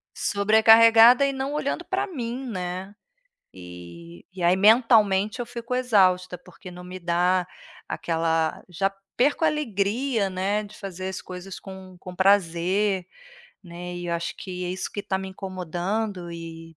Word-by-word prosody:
Sobrecarregada 225 +4 +6
e 275 - 0
não 270 +1 -4
olhando 300 +3 -2
para 390 +2 -2
mim, 255 - -5
né, 185 -1 -5 0.6
eh, 85 -1 -12
e 185 -1 -7
aí 175 +1 +4
mentalmente 215 0 +4
eu 245 - -3
fico 235 0 -6
exausta, 185 -7 +2
porque 180 +1 -14
não 180 0 -11
me 180 +1 -8
dá 180 +1 +1 0.4
aquela 165 -1 -1
já 195 +3 -1 0.3
perco 290 +5 +2
a - - +5
alegria, 230 -5 -1
né, 195 +3 -1
de 210 0 -13
fazer 190 -2 -6
as 190 - -6
coisas 185 +1 -9
com 190 -1 -11
com 180 0 -10
prazer, 190 +1 +2 0.6
né. 175 0 -8
E 175 0 -6
eu 170 - -1
acho 170 0 -4
que 180 -2 -6
é - - -3
isso 185 +1 -4
que 205 - -4
está 200 -1 -2
me 190 0 -6
incomodando, 185 +1 -4
e 165 -1 -9
190 Hz, 155 wpm, -24 LUFS, 180-220 Hz, 0.6 s, Sobrecarregada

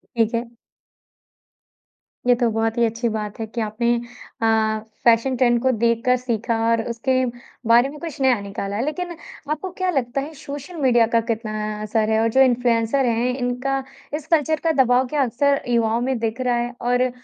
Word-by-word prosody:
ठीक 230 0 +1
है। 235 0 -3 1.8
ये 245 - +7
तो 240 -1 +1
बहुत 225 +1 -1
ही 235 - +3
अच्छी 230 +1 -1
बात 210 0 -4
है 220 - -2
कि 230 +1 -4
आपने 235 +3 0 0.5
अ, 220 -1 +2 0.2
फ़ैशन 235 +3 +4
ट्रेंड 240 -2 +3
को 260 0 +3
देखकर 235 +2 +3
सीखा 235 -2 -2
और 230 -1 +2
उसके 235 +3 -1 0.5
बारे 240 +4 +5
में 300 - -10
कुछ 325 -4 -7
नया 255 -5 +3
निकाला 200 0 -5
है 230 - -1
लेकिन 350 +2 -4 0.4
आपको 350 +4 -3
क्या 370 -1 0
लगता 270 -2 -1
है 310 +3 -7
सोशल 285 +5 -7
मीडिया 240 -3 +4
का 230 - +5
कितना 220 -1 -3 0.3
असर 215 0 0
है 220 0 +2
और 230 - +2
जो 265 - +4
इन्फ्लुएंसर 245 +1 +2
हैं 240 +2 +1
इनका 255 +2 -1 0.3
इस 305 0 -4
कल्चर 315 0 +2
का 325 - +3
दबाव 250 +1 +2
क्या 290 0 +1
अक्सर 280 +4 +1
युवाओं 230 0 +2
में 260 0 0
दिख 230 +2 -2
रहा 245 -1 +1
है 240 +1 -2
और 245 +1 +2
240 Hz, 185 wpm, -22 LUFS, 225-265 Hz, 1.8 s, ये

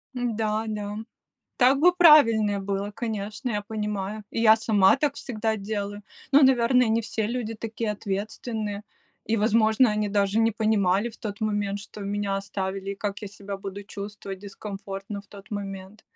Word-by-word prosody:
М-да, 225 -2 -1
да. 210 -1 -4 0.6
Так 260 +2 +5
бы 355 +2 +6
правильнее 230 - +6
было, 200 +1 -3
конечно, 215 +2 -4
я 205 -1 -1
понимаю. 210 -1 -4
И 230 - -2
я 220 -1 +7
сама 210 -1 +4
так 285 0 0
всегда 220 -2 -2
делаю. 205 0 -4 0.3
Ну, 285 +1 +7
наверное, 250 -2 +4
не 225 +1 +2
все 220 -1 -2
люди 230 -1 -3
такие 225 0 -4
ответственные. 210 +1 -4 0.4
И, 225 - 0
возможно, 220 +2 +4
они 210 0 0
даже 200 +1 +1
не 225 -1 +3
понимали 210 -1 +2
в - - -15
тот 205 -1 -6
момент, 205 -2 -1
что 205 +1 -11
меня 200 0 -2
оставили, 195 0 -4
и - - -3
как 200 0 -3
я 205 - -5
себя 200 0 -7
буду 195 +1 -7
чувствовать 200 -1 -7
дискомфортно 200 0 -7
в 200 - -21
тот 200 +2 -14
момент. 195 0 -6
210 Hz, 165 wpm, -26 LUFS, 200-225 Hz, 0.6 s, я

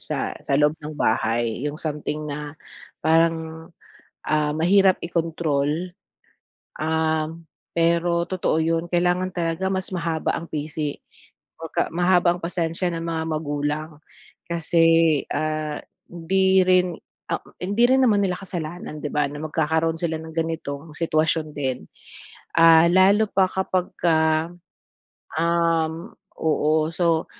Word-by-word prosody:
sa - - -3
sa 140 - 0
loob 150 0 +4
ng 150 0 -7
bahay, 115 -3 0
yung 145 - -6
something 150 -1 -4
na 150 0 -6 0.5
parang, 160 0 +1 0.6
ah, 150 -1 +1
mahirap 190 +3 +4
i-control. 165 0 -1 0.9
Um, 160 +1 -1 0.3
pero 170 +1 +2
totoo 185 -3 -1
'yun 165 +1 0
kailangan 180 +1 0
talaga 170 +2 -1
mas 190 0 -3
mahaba 165 -3 -1
ang 170 0 -5
pisi. 150 -1 -4 0.6
Kumbaga 165 -1 -2
mahaba 175 +1 +3
ang - - -11
pasensya 170 0 -1
ng 165 0 -4
mga 165 -1 -2
magulang, 150 0 -2 0.6
kasi, 170 0 +1 0.5
ah, 155 -1 -2 0.3
hindi 190 +2 +2
rin, 180 -2 +3 0.4
ah - - 0 0.2
hindi 200 +6 +1
rin 265 +1 +4
naman 205 -4 +3
nila 180 -2 -1
kasalanan 175 -4 -6
'di 150 - -3
ba 150 -1 +1
na 145 +1 -8
magkakaroon 160 +1 0
sila 165 -2 -1
ng 160 0 -9
ganitong 160 -2 -4
sitwasyon 155 -1 0
din. 130 -3 -2 0.7
Ah, 165 0 +7
lalo 200 +4 +5
pa 190 -1 +3
kapag 185 -1 -1
ka, 170 -2 +3 1.2
um, 165 +1 0 0.3
oo 155 0 +2
so, 165 -1 +1
165 Hz, 125 wpm, -23 LUFS, 155-175 Hz, 1.2 s, Ah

